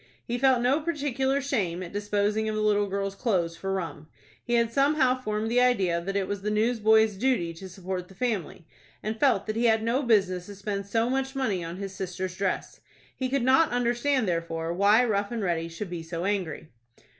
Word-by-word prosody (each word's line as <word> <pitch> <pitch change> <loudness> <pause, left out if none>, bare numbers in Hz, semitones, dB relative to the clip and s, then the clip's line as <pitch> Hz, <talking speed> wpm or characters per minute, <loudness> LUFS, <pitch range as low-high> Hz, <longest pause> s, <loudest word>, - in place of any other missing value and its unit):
He 240 +1 -2
felt 260 -2 +4
no 265 +5 +3
particular 280 -4 0
shame 190 -11 -1
at 175 - -9
disposing 210 +1 0
of 215 - -2
the 215 - -1
little 205 -1 +2
girl's 195 0 -2
clothes 185 -7 0
for 195 +3 -4
rum. 165 -5 -4 0.4
He 240 - 0
had 230 -1 +2
somehow 275 -2 +3
formed 215 -1 -2
the 245 +1 +4
idea 195 -9 +2
that 195 +3 -4
it 195 -2 0
was 205 -1 -3
the 210 - -2
newsboy's 220 0 +3
duty 220 -8 +1
to 190 +3 -10
support 185 0 -5
the 190 - -16
family, 200 -8 -3 0.4
and 220 +1 -3
felt 265 -9 +3
that 215 - -3
he 235 +2 +1
had 220 -1 +3
no 235 +4 +1
business 195 -7 +2
to 205 - -9
spend 200 0 -4
so 225 +3 +1
much 265 +1 -1
money 210 -10 -1
on 165 +2 -6
his 195 -1 -5
sister's 185 -1 -4
dress. 195 -1 -2 0.4
He 260 -1 -2
could 275 -1 0
not 265 +5 +5
understand, 245 +1 +1
therefore, 165 -1 -2
why 205 +6 +4
Rough 205 -3 0
and 230 -3 -2
Ready 170 -3 -1
should 170 +3 -7
be 175 -2 -4
so 165 +1 -5
angry. 185 -6 -2
210 Hz, 205 wpm, -27 LUFS, 185-245 Hz, 0.4 s, not